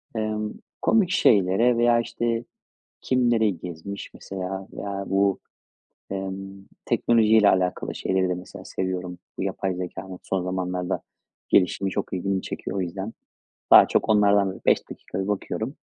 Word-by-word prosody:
Emm, 110 -1 -2 0.3
komik 210 -6 +3
şeylere 110 - +4
veya, 120 0 +4
işte, 115 0 -1 0.6
kim, 125 -2 +2
nereyi 110 -6 +2
gezmiş 90 +3 -7
mesela 95 0 -6
veya 100 -1 -4
bu, 100 0 +2 0.7
emm, 95 0 -5 0.2
teknolojiyle 110 -2 +4
alakalı 90 -1 0
şeyleri 95 -1 0
de 90 - 0
mesela 90 +1 -10
seviyorum. 90 -1 -3 0.2
Bu - - -2
yapay 95 -2 -2
zekânın 90 +1 -6
son 95 -2 -1
zamanlarda 90 -1 -2 0.5
gelişimi 95 +1 +3
çok - - -3
ilgimi 95 +1 -1
çekiyor. - - -5
O 95 - 0
yüzden 95 +5 -4 0.6
daha - - +10
çok - - +1
onlardan 100 -2 +4
da - - -9
bir - - -15
5 - - +3
dakika 95 - -7
bir - - -5
bakıyorum. 110 +5 -3
95 Hz, 145 wpm, -25 LUFS, 95-110 Hz, 0.7 s, daha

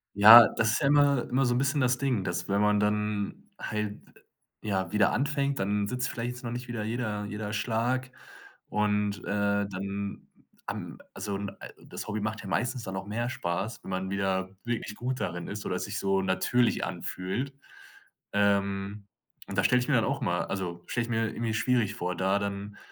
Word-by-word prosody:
Ja, 110 +3 +11
das 110 -1 +1
ist - - 0
ja 140 - +3
immer 145 -3 +4
immer 135 +2 +2
so 120 - +2
'n - - +2
bisschen 140 +3 +1
das 125 -1 +3
Ding, 125 -9 0
dass 90 +1 -3
wenn 100 0 +2
man 105 0 +3
dann 105 -1 -1
halt, 105 -1 -3 0.6
ja, 95 -3 -1
wieder 105 -2 +3
anfängt, 140 0 0
dann 100 +1 0
sitzt 125 +1 -1
vielleicht 120 +1 -3
jetzt 125 +2 -9
noch 120 - -4
nicht 125 +1 -5
wieder 120 -3 -3
jeder 110 -2 -2
jeder 105 0 -4
Schlag 125 +4 0 0.6
und, 105 -1 0
äh, - - -16 0.5
dann, 100 +1 -5 0.4
ähm, - - -5 0.2
also 100 -2 -3
n 100 0 -4
a - - -17 0.3
das - - -7
Hobby 105 +1 -1
macht 105 +1 -3
ja 100 - -8
meistens 120 +4 -1
dann 95 -3 -4
auch 95 - -5
mehr 120 +3 -2
Spaß, 100 +1 -3
wenn - - -7
man 95 0 -2
wieder 95 -1 0 0.2
wirklich 115 -3 -3
gut 125 +3 -3
darin 90 0 -3
ist 105 +1 -6
oder - - -1
es - - -3
sich - - -4
so 95 0 +1
natürlich 95 +6 +2
anfühlt. 110 +10 -3 0.8
Ähm. 100 0 +1 0.4
Und - - -5
da - - +3
stelle 125 0 +4
ich 125 - -3
mir 140 - +4
dann 115 - +3
auch 140 0 -1
immer 90 0 0
also 90 -3 -3
stelle 120 - 0
ich - - -10
mir 115 -1 +1
irgendwie 115 0 -2
schwierig 115 -3 +1
vor, 90 -5 -2
da 95 +1 +2
dann 100 0 -4
105 Hz, 200 wpm, -29 LUFS, 100-120 Hz, 0.8 s, Ja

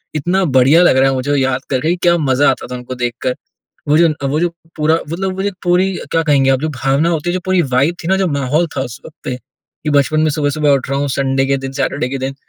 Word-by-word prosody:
इतना 175 +6 0
बढ़िया 135 +7 +5
लग 155 - +4
रहा 135 +1 +4
है 135 - 0
मुझे 130 +2 -2
वो 145 - +2
याद 130 -1 0
करके 135 +3 0
कि 175 - +2
क्या 175 0 +4
मज़ा 145 -2 +2
आता 130 - -2
था - - -3
उनको 125 +1 -7
देखकर। 125 +1 -2 0.5
वो 150 - +4
जो 170 0 +5
न 155 - -1 0.2
वो 150 - 0
जो 175 - +2 0.3
पूरा 155 0 +2 0.2
मतलब 190 +2 -2
वो 190 - -2
जो 205 - 0
पूरी, 180 +2 +2 0.2
क्या 165 - +1
कहेंगे 140 -4 +3
आप, 130 -1 +2
जो 155 - -1
भावना 135 +3 0
होती 165 0 -2
है, - - -2
जो 185 - -1
पूरी 185 -1 +2
वाइब 150 +7 +2
थी - - -3
ना, 190 - +3
जो 190 -1 +1
माहौल 145 +3 0
था - - 0
उस 125 0 -7
वक़्त 155 - -13
पे, 125 - -3 0.5
कि 150 - -2
बचपन 145 +2 +2
में 155 0 +2
सुबह-सुबह 145 0 0
उठ 135 -2 0
रहा 140 - 0
हूँ 145 0 -1
संडे 135 0 0
के 135 0 +1
दिन, 135 0 -6
सैटर्डे 135 -1 -2
के 135 +1 -4
दिन, 135 +1 -4
145 Hz, 275 wpm, -16 LUFS, 135-165 Hz, 0.5 s, बढ़िया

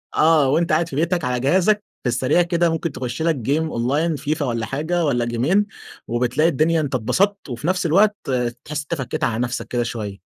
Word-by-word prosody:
آه، 155 -3 +4
وأنت 165 +5 +1
قاعد 160 +2 +2
في 135 - -7
بيتك 170 +2 0
على 125 -1 -1
جهازك 190 - +2 0.2
في 125 - 0
السريع 130 +8 +2
كده 170 0 +1
ممكن 165 0 -2
تخش 125 0 -5
لك 165 0 +2
جيم 145 +6 -1
أونلاين 145 +8 0
فيفا 150 +1 -2
والّا 115 -3 -2
حاجة 160 +7 -1
والّا 120 -5 +1
جيمين 135 - +1 0.4
وبتلاقي 125 +7 +1
الدنيا 160 +2 +2
أنت 140 -3 -2
انبسطت 195 - 0
وفي 125 +5 -4
نفس 185 0 0
الوقت 200 +6 +4 0.5
تحس 150 0 -3
أنت 150 +3 -4
فكيت 145 +2 -4
على 115 -5 0
نفسك 125 0 -2
كده 120 -1 -1
شوية. 105 -4 -5
150 Hz, 195 wpm, -21 LUFS, 125-170 Hz, 0.5 s, آه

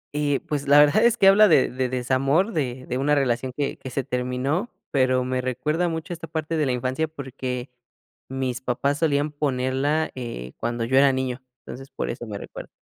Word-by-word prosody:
Y, 145 -2 +1
pues 145 -2 -4
la 145 - +6
verdad 150 +10 +5
es 235 0 +4
que 195 - +5
habla 205 +2 +7
de 155 -8 +4
de 130 0 -1
desamor, 135 - +1
de 130 -4 -2
de 125 +1 -2
una 150 +2 +2
relación 130 -2 0
que 145 -1 -2
que 130 - -8
se 135 +1 -2
terminó, 125 - -2 0.2
pero 130 -1 +2
me 130 0 -1
recuerda 150 +7 -1
mucho 160 +1 -4
esta 165 -1 -8
parte 160 +1 -3
de 150 -3 +1
la - - +1
infancia 130 +5 -1
porque 130 -4 -6 0.6
mis 130 -2 -3
papás 135 +3 -1
solían 150 -2 +1
ponerla, 140 +2 0
eh, 115 - -6
cuando 120 0 -2
yo 130 +2 +2
era 140 0 +6
niño. 130 -1 -2 0.2
Entonces, 135 +2 -9
por - - -4
eso 120 -1 -7
me 105 - -5
recuerdo. - - -9
135 Hz, 195 wpm, -24 LUFS, 125-150 Hz, 0.6 s, habla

